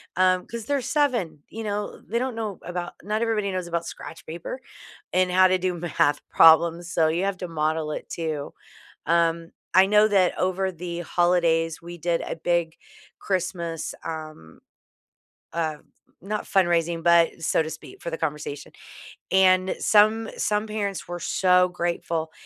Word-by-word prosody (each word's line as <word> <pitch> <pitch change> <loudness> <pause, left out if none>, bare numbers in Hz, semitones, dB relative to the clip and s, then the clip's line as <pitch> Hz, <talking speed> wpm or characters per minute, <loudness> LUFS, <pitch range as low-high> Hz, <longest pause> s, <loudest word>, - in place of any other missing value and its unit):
Um, 185 0 +3
'cause 230 -2 -6
they're 280 +2 0
7, 240 - 0
you 225 - -6
know? 205 -1 -4
They 230 - -1
don't 255 -1 -2
know 215 -4 -4
about 175 0 -5
not 215 +2 -1
everybody 215 -4 0
knows 185 -2 -3
about 170 0 -2
scratch 165 0 -9
paper 170 +10 -6 0.5
and 185 0 +2
how 185 +1 +6
to 185 0 +2
do 185 0 0
math 160 -4 +1
problems, 170 +2 +5
so 160 -1 +3
you 170 +4 0
have 200 -1 -1
to 180 - -5
model 155 -1 -1
it - - -6
too. 155 -4 -4 0.5
Um, 165 0 +1 0.2
I 190 +2 +7
know 210 +1 +5
that 195 -4 +2
over 185 +1 0
the 175 0 -6
holidays, 170 -2 +1
we 175 +1 -9
did 170 +1 0
a - - -4
big 165 0 0 0.4
Christmas, 170 -3 -3
um, 155 - -8 0.9
uh, 160 -2 -1 0.4
not 210 +3 -4
fundraising, 170 -3 +1
but 170 -1 +4
so 160 - +2
to 155 - -5
speak, 160 0 -11
for 170 - -4
the 165 - -3
conversation, 150 -2 -4 0.6
and 185 0 +4
some 220 +1 +4
some 210 +1 0
parents 205 -3 -3
were 175 0 -5
so 180 +1 +3
grateful 170 -2 -2
175 Hz, 160 wpm, -25 LUFS, 165-195 Hz, 0.9 s, I